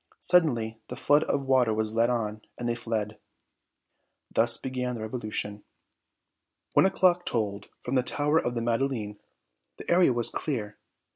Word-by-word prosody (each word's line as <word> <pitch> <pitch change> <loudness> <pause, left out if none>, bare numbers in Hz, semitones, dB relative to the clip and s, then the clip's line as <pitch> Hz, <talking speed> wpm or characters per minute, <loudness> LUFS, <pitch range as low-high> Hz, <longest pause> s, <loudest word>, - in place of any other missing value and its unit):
Suddenly 120 -11 +2
the - - -6
flood 145 +1 +3
of 140 - -1
water 125 -4 +3
was 110 0 -1
let 115 +1 +3
on 110 -3 -2 0.2
and 120 - -3
they 120 - +1
fled. 110 -3 -3 1.1
Thus 115 0 +3
began 125 -1 -3
the 115 - -6
revolution. 110 -2 -4 1.1
One - - +5
o'clock 180 -2 +3
tolled 100 - -2
from 125 - -4
the 130 - +4
tower 150 +5 +1
of 120 -4 -2
the 115 - -2
Madeleine. 115 -3 -1 0.6
The - - -5
area 175 -4 +5
was 120 -1 +2
clear. 110 -9 -4
120 Hz, 150 wpm, -27 LUFS, 110-135 Hz, 1.1 s, One